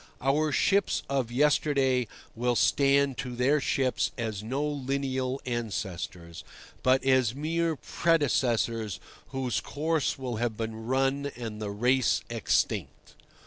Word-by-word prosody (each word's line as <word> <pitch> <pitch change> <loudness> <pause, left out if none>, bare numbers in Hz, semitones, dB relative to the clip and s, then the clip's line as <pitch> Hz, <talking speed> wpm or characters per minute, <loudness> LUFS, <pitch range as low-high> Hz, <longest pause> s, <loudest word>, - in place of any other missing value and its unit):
Our 150 +4 +1
ships 200 +6 +2
of 135 -4 -1
yesterday 135 -2 +2 0.3
will 120 +1 0
stand 140 +1 +3
to 125 -2 -4
their 135 +4 +2
ships 130 -1 +1
as 110 -4 -3
no 130 +7 -2
lineal 135 -2 -2
ancestors, 90 -8 -4 0.4
but 130 +1 +3
as 130 -3 +3
mere 165 +2 0
predecessors 120 - 0 0.3
whose 125 -8 -2
course 155 -1 -1
will 125 -4 -4
have 115 -1 -1
been 110 0 -5
run 135 +2 +1
and 115 -3 -6
the 105 - -3
race 125 +5 +2
extinct. - - -1
130 Hz, 120 wpm, -28 LUFS, 115-140 Hz, 0.4 s, stand